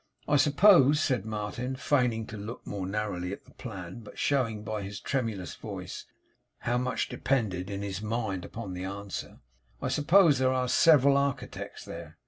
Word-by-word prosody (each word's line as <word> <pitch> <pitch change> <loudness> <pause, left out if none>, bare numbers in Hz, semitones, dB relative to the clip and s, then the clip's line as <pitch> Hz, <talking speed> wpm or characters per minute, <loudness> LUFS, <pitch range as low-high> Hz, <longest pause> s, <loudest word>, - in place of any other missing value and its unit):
'I 145 - +4
suppose,' 150 0 +6
said 125 -8 0
Martin, 110 +4 -3
feigning 125 -5 +1
to 110 - -8
look 105 +3 -7
more 95 -2 -4
narrowly 95 -3 -2
at 100 - -8
the - - -18
plan, 95 -4 -7
but 110 - -12
showing 115 -7 0
by 110 0 -3
his 100 0 -6
tremulous 115 -9 -2
voice - - -7 0.5
how 120 +1 +1
much 125 0 -1
depended, 100 -8 -1
in 100 0 -4
his 100 -1 -4
mind, 110 -4 -2
upon 105 -2 -6
the 90 0 -5
answer; 100 +1 -6 0.4
'I - - -2
suppose 160 -2 +5
there 130 0 +3
are 130 -1 0
several 140 -1 +6
architects 140 -2 -3
there? 85 -1 -9
115 Hz, 165 wpm, -29 LUFS, 100-130 Hz, 0.5 s, suppose